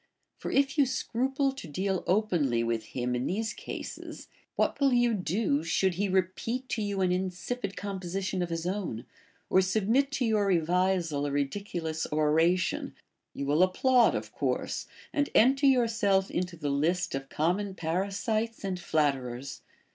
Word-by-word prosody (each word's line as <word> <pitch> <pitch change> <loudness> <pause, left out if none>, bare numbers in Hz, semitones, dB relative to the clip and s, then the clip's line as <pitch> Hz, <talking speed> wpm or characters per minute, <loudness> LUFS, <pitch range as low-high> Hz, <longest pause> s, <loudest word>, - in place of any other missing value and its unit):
For - - -4
if 280 +2 +2
you 280 - +5
scruple 265 +2 0
to 265 -10 -9
deal 190 +4 -1
openly 175 - +2
with 115 -1 -1
him 125 +2 -3
in 125 +2 -1
these 215 +4 -1
cases, - - -8 0.3
what - - +1
will 275 -2 +4
you 240 -1 +3
do, 180 -5 0
should 180 +3 +1
he 200 +3 -1
repeat 190 +7 -1
to 225 - -1
you 200 -2 -1
an 185 -1 +2
insipid 185 +4 -3
composition 190 -1 -3
of 175 - -2
his 165 0 -3
own, 180 - -3 0.4
or 190 - +4
submit 220 +8 +2
to 260 - 0
your 215 -3 +2
revisal 175 -4 +1
a - - -3
ridiculous 160 +2 -2
oration 160 +4 +1 0.2
] - - -55
You 140 - -3
will 145 +4 +2
applaud, 240 +7 +4
of - - -4
course, - - -2 0.3
and 290 -1 +1
enter 270 +5 +5
yourself 225 -7 +3
into 180 -1 -2
the 145 -3 -2
list 165 +6 0
of 135 0 -4
common 185 +5 0
parasites 200 +7 -1
and 190 -2 -2
flatterers 135 -5 -1
185 Hz, 155 wpm, -29 LUFS, 160-220 Hz, 0.4 s, you